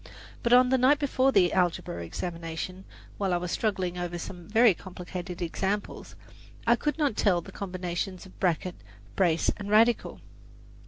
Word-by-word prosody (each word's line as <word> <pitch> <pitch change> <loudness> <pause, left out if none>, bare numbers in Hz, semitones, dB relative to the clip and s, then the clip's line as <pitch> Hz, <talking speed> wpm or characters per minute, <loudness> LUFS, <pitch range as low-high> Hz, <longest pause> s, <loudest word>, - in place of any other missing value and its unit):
But 235 - 0
on 250 +1 +7
the 260 0 +3
night 265 +4 +5
before 270 -2 +2
the 185 -7 +4
algebra 175 - 0
examination, 170 - -5 0.3
while 190 -3 +1
I - - +2
was 175 0 -4
struggling 185 -5 -1
over 175 0 -3
some 175 0 -8
very 225 0 +5
complicated 180 0 -7
examples, 195 +4 -3 0.5
I 235 +1 +5
could 295 +4 -2
not 290 -8 +1
tell 190 -5 +3
the - - -10
combinations 185 0 -4
of 190 - -16
bracket, 180 -1 0 0.4
brace 170 -4 +2
and 205 -1 -6
radical. 225 +3 +3
185 Hz, 155 wpm, -28 LUFS, 175-225 Hz, 0.5 s, on